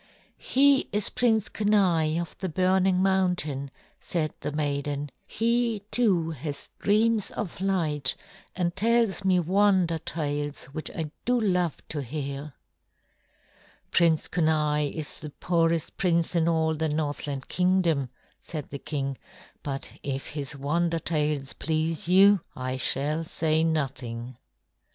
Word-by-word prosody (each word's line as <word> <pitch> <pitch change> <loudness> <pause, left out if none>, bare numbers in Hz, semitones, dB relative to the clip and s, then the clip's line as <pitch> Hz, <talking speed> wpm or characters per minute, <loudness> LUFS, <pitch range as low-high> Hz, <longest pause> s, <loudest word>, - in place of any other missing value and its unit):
"He 275 +1 +3
is 205 0 0
Prince 220 -4 +2
Kenai 180 -7 +2
of 170 -2 -5
the 190 - -2
burning 185 +2 +2
mountain," 180 -8 +1 0.3
said 155 -3 -2
the - - -3
maiden. 145 -1 -2 0.2
"He, 230 -2 0
too, 185 -9 +2
has 145 -1 -6
dreams 215 +1 +2
of 185 -4 -5
light 160 -8 +1 0.4
and 175 -2 -1
tells 225 -1 +2
me 185 -1 +3
wonder 185 -1 +3
tales 145 -2 -3
which 155 +2 -5
I 155 -3 -5
do 245 0 +2
love 180 -7 0
to 150 - -3
hear." 140 +1 -5 1.4
"Prince 165 -2 +3
Kenai 150 -3 +1
is 155 -2 -4
the 155 - -6
poorest 165 +1 0
prince 170 -3 +1
in 165 -1 +3
all 160 -1 +2
the 160 0 -1
Northland 145 -2 -3
Kingdom," 180 -7 +2 0.3
said 155 -5 -7
the 140 - -5
king; 135 -3 -3 0.4
"but 140 -1 -4
if 135 -1 -4
his 145 -1 -4
wonder 165 +5 0
tales 150 -4 -1
please 160 +1 -1
you, 195 +1 +6
I 130 0 -3
shall 145 +5 +1
say 160 0 +1
nothing." 130 -6 -2
160 Hz, 125 wpm, -27 LUFS, 145-185 Hz, 1.4 s, you